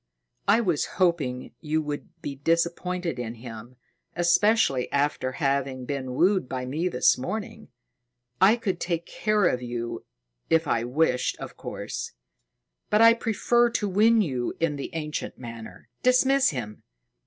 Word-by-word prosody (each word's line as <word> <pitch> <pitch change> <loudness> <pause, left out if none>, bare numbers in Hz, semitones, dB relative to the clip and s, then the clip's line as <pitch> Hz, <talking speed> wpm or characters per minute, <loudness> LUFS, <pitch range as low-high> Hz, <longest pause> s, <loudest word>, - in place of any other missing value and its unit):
"I 230 - +5
was 175 -9 +1
hoping 150 -9 0
you 155 +1 0
would 145 -1 -5
be 140 - -3
disappointed 170 +1 -1
in 120 -1 -4
him, 115 +1 -10 0.4
especially 175 - +3
after 140 -2 0
having 135 -3 -1
been 130 -2 -4
wooed 185 -2 +2
by 130 -1 -3
me 155 +8 -1
this 125 -8 +3
morning. 205 +12 -5 0.7
I 200 +4 +7
could 195 -7 -3
take 170 +4 -4
you 125 - 0 0.5
if 165 0 +3
I 115 -3 +1
wished, 125 0 +1
of - - -8
course; - - -6 0.8
but 210 - +3
I 230 0 +9
prefer 240 +1 +2
to 220 -2 -1
win 215 +3 +4
you 130 -8 -2
in 165 -3 0
the 140 - -5
ancient 150 -1 -4
manner. 115 -2 -10
Dismiss 260 +2 +4
him!" 115 -7 -6
155 Hz, 135 wpm, -26 LUFS, 130-195 Hz, 0.8 s, I